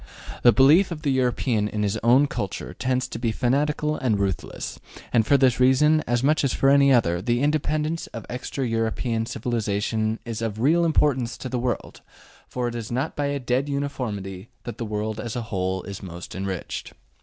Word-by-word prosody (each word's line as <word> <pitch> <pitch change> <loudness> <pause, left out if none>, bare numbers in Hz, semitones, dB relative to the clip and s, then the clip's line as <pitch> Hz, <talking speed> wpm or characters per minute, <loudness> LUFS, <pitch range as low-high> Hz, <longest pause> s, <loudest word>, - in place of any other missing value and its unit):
The 120 - +7
belief 145 - +5
of 165 -3 -6
the 145 - +1
European 125 -4 +1
in 105 0 -2
his 105 +1 0
own 125 +5 +5
Kultur 100 -8 -4
tends 130 0 -1
to - - -6
be 115 -1 0
fanatical 150 +6 0
and 115 -6 +1
ruthless, 100 -2 -3 0.3
and 115 -3 +3
for 140 - +5
this 130 -3 +3
reason, 150 +5 +4
as 120 +1 +1
much 150 +2 +3
as 135 - +1
for 135 - +3
any 140 0 +5
other, 85 -9 +3
the 120 +3 0
independence 155 +3 0
of 115 - -8
extra 125 +2 -4
European 115 0 -1
civilization 110 -1 -1
is 115 -1 -4
of 110 -2 -3
real 165 +8 +3
importance 135 -7 +1
to 130 - -6
the 125 0 -2
world, 120 -2 -3 0.5
for 125 -1 -2
it 120 - -4
is 115 -1 -5
not 130 +6 -2
by 145 -1 -1
a 140 0 -1
dead 130 +3 0
uniformity 110 -9 -4
that 120 - -7
the 115 - -2
world 105 0 -3
as 110 0 -5
a 120 - -2
whole 95 -3 -2
is 100 -1 -7
most 85 -2 -8
enriched. 95 -1 -5
120 Hz, 190 wpm, -24 LUFS, 110-140 Hz, 0.5 s, The